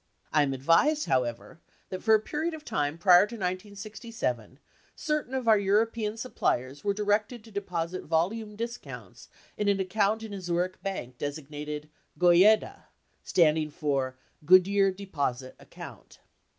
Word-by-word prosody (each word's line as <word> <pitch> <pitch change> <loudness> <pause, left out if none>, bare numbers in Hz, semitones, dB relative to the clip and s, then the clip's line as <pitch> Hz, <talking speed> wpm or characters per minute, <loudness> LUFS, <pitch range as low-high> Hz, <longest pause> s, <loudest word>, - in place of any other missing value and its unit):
I 150 - +5
am 140 -2 +1
advised, 165 - +3
however, 125 +3 -2 0.3
that 185 - -5
for 220 - +5
a - - +3
period 315 +8 -3
of 305 -1 -12
time 145 +1 -1
prior 180 +2 +6
to 235 - -8
1967, 200 - -4 0.4
certain 300 -5 -2
of 255 -3 -3
our 220 -2 +6
European 215 +2 +1
sup 250 +2 -7
pliers 130 +3 -1
were 205 - +1
directed 210 +3 0
to 225 - -15
deposit 180 -3 -4
volume 210 +7 -1
discounts 235 +2 -8 0.3
in 210 - -1
an 200 -1 +2
account 205 +3 0
in 220 -2 -7
a 195 - -6
Zurich 180 +1 -2
bank 130 -11 -5
designated 150 +1 -5 0.3
"Goyeda," 180 +5 +4 0.4
standing 155 -2 +2
for 140 -4 -2 0.3
Good 185 +3 +6
year 200 -1 +3
deposit 145 -10 -4
account. - - -12
190 Hz, 145 wpm, -28 LUFS, 150-215 Hz, 0.4 s, prior